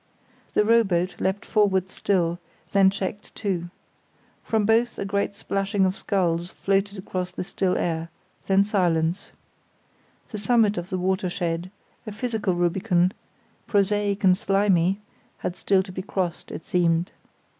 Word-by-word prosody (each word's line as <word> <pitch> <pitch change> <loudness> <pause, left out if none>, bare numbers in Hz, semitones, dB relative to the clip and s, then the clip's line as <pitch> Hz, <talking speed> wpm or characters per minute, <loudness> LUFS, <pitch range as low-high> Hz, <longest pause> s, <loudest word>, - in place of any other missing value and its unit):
The 210 - +4
rowboat 195 -6 +2
leapt 190 +2 -1
forward 190 -4 +2
still; 175 -3 0 0.3
then 195 -1 +6
checked, 200 +1 -5
too. 180 -5 -2 0.7
From 220 -2 +1
both 230 +2 +2
a - - -3
great 200 0 -1
splashing 195 0 0
of 185 0 0
sculls 175 -5 0
floated 195 +2 0
across 185 -1 -4
the 180 - -5
still 185 0 0
air, 165 -1 -2 0.4
then 195 0 +5
silence. 175 -3 0 1.0
The 215 - -5
summit 215 -1 +3
of 175 +2 -7
the 185 - -2
watershed, 180 -2 -1 0.4
a - - -4
physical 215 -3 -1
Rubicon, 175 +1 +2 0.6
prosaic 205 0 +1
and 185 -1 +6
slimy, 195 -1 +2 0.4
had 175 - -4
still 190 -1 +2
to 185 - -10
be 185 - -5
crossed, 185 -3 -3
it - - -7
seemed. 175 -3 +1
190 Hz, 135 wpm, -25 LUFS, 180-205 Hz, 1.0 s, then